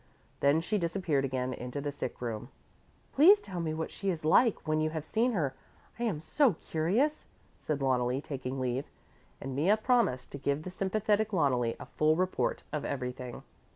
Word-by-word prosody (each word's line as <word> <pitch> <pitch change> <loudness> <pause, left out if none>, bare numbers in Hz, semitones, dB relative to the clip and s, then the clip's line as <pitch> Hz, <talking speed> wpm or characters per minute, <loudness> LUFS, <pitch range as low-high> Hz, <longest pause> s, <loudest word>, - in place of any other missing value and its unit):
Then 145 +3 +4
she 210 +5 -1
disappeared 170 -5 0
again 130 -1 -2
into 125 +3 -5
the 145 0 -3
sick 145 - -5
room. 115 +1 -4 0.6
"Please 370 +9 +7
tell 185 - -6
me 165 -2 -1
what 160 +1 -3
she 195 - -3
is 165 -4 -2
like, 215 +5 +4
when 155 0 +2
you 155 - +1
have 155 -1 -5
seen 235 +7 +1
her. 150 -9 0 0.5
I 240 - 0
am 190 -10 -1
so 240 - +3
curious," 200 - 0 0.3
said 150 -2 -2
Loneli, 125 -1 +1
taking 135 -2 -5
leave, 130 +1 -2 0.5
and 135 -1 -5
Mea 175 +10 +4
promised 220 - +1
to 140 - -6
give 140 +2 -1
the 185 - -6
sympathetic 210 +3 +1
Loneli 125 -8 +2
a - - -7
full 155 +1 +2
report 185 +2 0
of 150 - -2
everything. 125 -2 -4
155 Hz, 180 wpm, -30 LUFS, 135-195 Hz, 0.6 s, Please